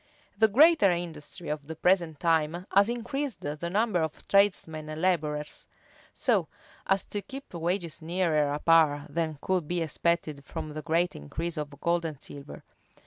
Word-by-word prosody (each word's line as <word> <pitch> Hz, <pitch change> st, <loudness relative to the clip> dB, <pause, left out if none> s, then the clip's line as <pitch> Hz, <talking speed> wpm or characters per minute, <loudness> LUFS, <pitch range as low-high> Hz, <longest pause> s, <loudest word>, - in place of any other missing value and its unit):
The 220 Hz, +2 st, +5 dB
greater 285 Hz, -, +6 dB
industry 170 Hz, -1 st, -4 dB
of 150 Hz, -1 st, -4 dB
the 160 Hz, -, -6 dB
present 170 Hz, -3 st, +2 dB
times 165 Hz, +1 st, +1 dB
has 200 Hz, +2 st, +5 dB
increased 250 Hz, +3 st, -3 dB
the 150 Hz, +4 st, -4 dB
number 205 Hz, -1 st, +1 dB
of 160 Hz, -1 st, -4 dB
tradesmen 170 Hz, -6 st, +2 dB
and 155 Hz, 0 st, -5 dB
laborers, 150 Hz, -4 st, -1 dB, 0.4 s
so -, -, +1 dB, 0.4 s
as 195 Hz, 0 st, +2 dB
to 205 Hz, -, -4 dB
keep 270 Hz, +1 st, -10 dB
wages 170 Hz, -1 st, -2 dB
nearer 160 Hz, -3 st, +1 dB
a 145 Hz, -, -1 dB
par 150 Hz, -2 st, +4 dB
than 160 Hz, -1 st, -2 dB
could 185 Hz, -5 st, 0 dB
be 175 Hz, +1 st, -1 dB
expected 160 Hz, -2 st, -1 dB
from 145 Hz, -, -6 dB
the 155 Hz, -, -5 dB
great 170 Hz, +3 st, +1 dB
increase 160 Hz, -, -5 dB
of 145 Hz, -2 st, -6 dB
gold 170 Hz, 0 st, +1 dB
and 155 Hz, -4 st, -5 dB
silver. 140 Hz, 0 st, -10 dB
170 Hz, 160 wpm, -28 LUFS, 150-185 Hz, 0.4 s, greater